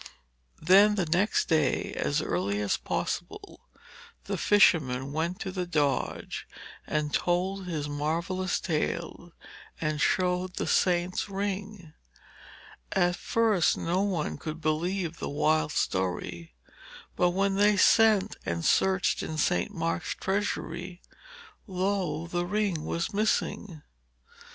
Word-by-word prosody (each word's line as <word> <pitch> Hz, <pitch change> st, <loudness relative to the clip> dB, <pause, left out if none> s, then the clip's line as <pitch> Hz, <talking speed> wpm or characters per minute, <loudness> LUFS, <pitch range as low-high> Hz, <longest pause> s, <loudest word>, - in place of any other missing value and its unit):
Then 200 Hz, +5 st, +6 dB
the 190 Hz, -4 st, 0 dB
next 180 Hz, +6 st, +1 dB
day, 155 Hz, -5 st, +1 dB
as 150 Hz, +2 st, 0 dB
early 100 Hz, +4 st, -1 dB
as 105 Hz, -1 st, +1 dB
possible, -, -, -4 dB, 0.6 s
the -, -, -3 dB
fisherman 140 Hz, -10 st, +3 dB
went 165 Hz, +4 st, -2 dB
to 190 Hz, -, -3 dB
the 180 Hz, -1 st, -3 dB
Doge 145 Hz, -6 st, -1 dB, 0.4 s
and 150 Hz, -1 st, -1 dB
told 185 Hz, +2 st, 0 dB
his 155 Hz, -4 st, -3 dB
marvellous 170 Hz, +6 st, -1 dB
tale 170 Hz, +1 st, -3 dB, 0.5 s
and 155 Hz, -2 st, -1 dB
showed 180 Hz, 0 st, +1 dB
the -, -, -2 dB
saint's 180 Hz, +2 st, +1 dB
ring. 200 Hz, -3 st, -4 dB, 1.0 s
At 175 Hz, -2 st, +2 dB
first 215 Hz, -8 st, +2 dB
no 175 Hz, +3 st, 0 dB
one 185 Hz, -6 st, -2 dB
could 155 Hz, 0 st, -6 dB
believe 165 Hz, +2 st, -1 dB
the -, -, -4 dB
wild 155 Hz, +2 st, +1 dB
story, 90 Hz, -, -2 dB, 0.6 s
but 180 Hz, -, +3 dB
when 195 Hz, +2 st, +1 dB
they 205 Hz, +1 st, +3 dB
sent 215 Hz, -1 st, +4 dB
and 85 Hz, 0 st, -3 dB
searched 190 Hz, 0 st, +2 dB
in 155 Hz, -, -5 dB
St. 175 Hz, +6 st, +1 dB
Mark's 165 Hz, -2 st, -2 dB
treasury, 190 Hz, -2 st, -3 dB, 0.7 s
lo! 190 Hz, -3 st, -1 dB
the 175 Hz, +1 st, -2 dB
ring 200 Hz, -5 st, -1 dB
was 170 Hz, +3 st, -2 dB
missing. 205 Hz, -5 st, -1 dB
175 Hz, 115 wpm, -28 LUFS, 155-195 Hz, 1.0 s, Then